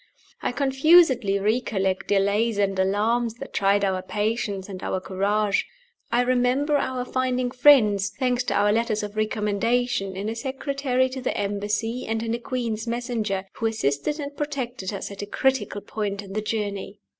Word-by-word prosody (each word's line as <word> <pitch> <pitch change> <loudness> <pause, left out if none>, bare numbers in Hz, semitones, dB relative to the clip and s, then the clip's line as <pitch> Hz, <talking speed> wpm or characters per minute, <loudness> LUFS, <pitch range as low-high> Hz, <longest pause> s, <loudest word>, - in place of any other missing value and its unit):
I - - -1
confusedly 270 - +4
recollect 195 -3 0
delays 205 +3 +2
and 195 -2 +1
alarms 220 +5 +1
that - - -9
tried 200 +1 +3
our 190 -1 0
patience 205 -1 -2
and 190 -2 -7
our 185 - -2
courage. 200 +2 0 0.4
I 245 - +3
remember 255 +4 +2
our 260 -2 -2
finding 255 -1 -1
friends 220 -7 +5
(thanks 250 -1 +1
to - - -1
our 205 +1 +3
letters 225 -2 0
of 205 0 -6
recommendation) 215 0 0
in 195 +2 -4
a 225 - -2
Secretary 265 0 -1
to 260 0 -6
the 255 - -2
Embassy 205 +4 -2
and 225 0 -1
in 230 0 -2
a 235 - -2
Queen's 235 -2 -3
Messenger, 230 -5 -2
who 225 - -1
assisted 220 - -1
and 285 -1 -5
protected 260 -9 -3
us 200 0 -5
at 200 - -7
a 205 - -5
critical 265 -3 0
point 205 -1 -4
in 195 -1 -10
the 215 - -1
journey. 205 -2 -3
220 Hz, 165 wpm, -24 LUFS, 200-250 Hz, 0.4 s, friends